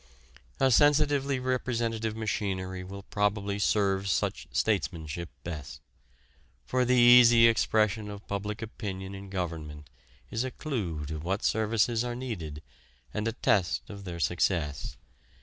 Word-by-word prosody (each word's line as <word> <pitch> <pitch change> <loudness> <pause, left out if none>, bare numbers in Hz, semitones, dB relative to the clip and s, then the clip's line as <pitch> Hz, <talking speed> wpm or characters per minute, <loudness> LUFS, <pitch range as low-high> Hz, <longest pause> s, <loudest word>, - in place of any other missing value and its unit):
A 135 -1 +4
sensitively 145 0 +3
representative 115 -3 -1
machinery 95 -4 -2
will 100 +1 -8
probably 100 0 -1
serve 100 -1 +1
such - - -1
statesmanship 85 -6 -1
best. 70 -6 -7 0.9
For 125 0 +1
the 125 +1 +3
easy 120 -1 +8
expression 110 -1 +1
of 100 0 -9
public 105 +2 -4
opinion 95 -3 -6
in 100 0 -9
government 80 -5 -5 0.4
is 115 - -1
a 130 - -2
clue 100 - -4
to 80 +2 -5
what 95 +6 -2
services 110 +1 +1
are 120 -1 -3
needed 85 - -6 0.5
and 105 +1 -2
a 115 - -1
test 95 -6 +1
of 100 -1 -9
their 85 -3 -6
success. 75 0 -1
105 Hz, 130 wpm, -29 LUFS, 90-115 Hz, 0.9 s, easy